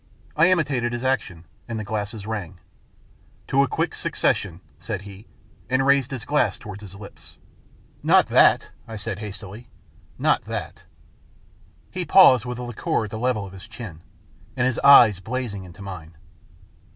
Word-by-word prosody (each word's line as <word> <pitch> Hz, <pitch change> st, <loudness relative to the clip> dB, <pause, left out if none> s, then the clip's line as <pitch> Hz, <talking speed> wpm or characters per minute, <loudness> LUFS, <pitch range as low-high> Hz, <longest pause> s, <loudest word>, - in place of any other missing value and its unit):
I 165 Hz, +3 st, +5 dB
imitated 135 Hz, -9 st, +1 dB
his 120 Hz, +1 st, -4 dB
action, 95 Hz, -11 st, -2 dB, 0.2 s
and 115 Hz, -2 st, -4 dB
the -, -, -4 dB
glasses 105 Hz, -1 st, -4 dB
rang. 100 Hz, -5 st, -5 dB, 0.4 s
" -, -, -32 dB
To 135 Hz, -, +4 dB
a 140 Hz, -, +2 dB
quick -, -, -2 dB
suc -, -, -4 dB
cession," 90 Hz, -4 st, 0 dB, 0.2 s
said 100 Hz, -3 st, -5 dB
he, 100 Hz, +2 st, -12 dB, 0.4 s
and 130 Hz, +1 st, +2 dB
raised 140 Hz, -2 st, +3 dB
his 130 Hz, -5 st, -6 dB
glass 145 Hz, 0 st, +1 dB
towards 105 Hz, -2 st, -9 dB
his 100 Hz, -2 st, -11 dB
lips. 100 Hz, 0 st, -12 dB, 0.3 s
" -, -, -31 dB
Not -, -, +7 dB
that," -, -, +4 dB, 0.2 s
I 115 Hz, -, -7 dB
said 105 Hz, -1 st, -5 dB
hastily. 105 Hz, +2 st, -9 dB, 0.3 s
" -, -, -30 dB
Not -, -, +3 dB
that." -, -, -6 dB, 1.1 s
He 185 Hz, -, -3 dB
paused, 130 Hz, -, +6 dB
with 125 Hz, -1 st, -5 dB
the 125 Hz, -, -5 dB
liqueur 120 Hz, -1 st, -2 dB
at 105 Hz, -, -7 dB
the 110 Hz, -, -5 dB
level 120 Hz, -4 st, 0 dB
of 95 Hz, -, -11 dB
his 95 Hz, -, -11 dB
chin, 90 Hz, -10 st, -9 dB, 0.6 s
and 125 Hz, -, +2 dB
his 130 Hz, -2 st, 0 dB
eyes 120 Hz, -8 st, +7 dB
blazing 110 Hz, -2 st, -4 dB
into 90 Hz, +3 st, -12 dB
mine. 85 Hz, -5 st, -9 dB
110 Hz, 175 wpm, -23 LUFS, 100-130 Hz, 1.1 s, Not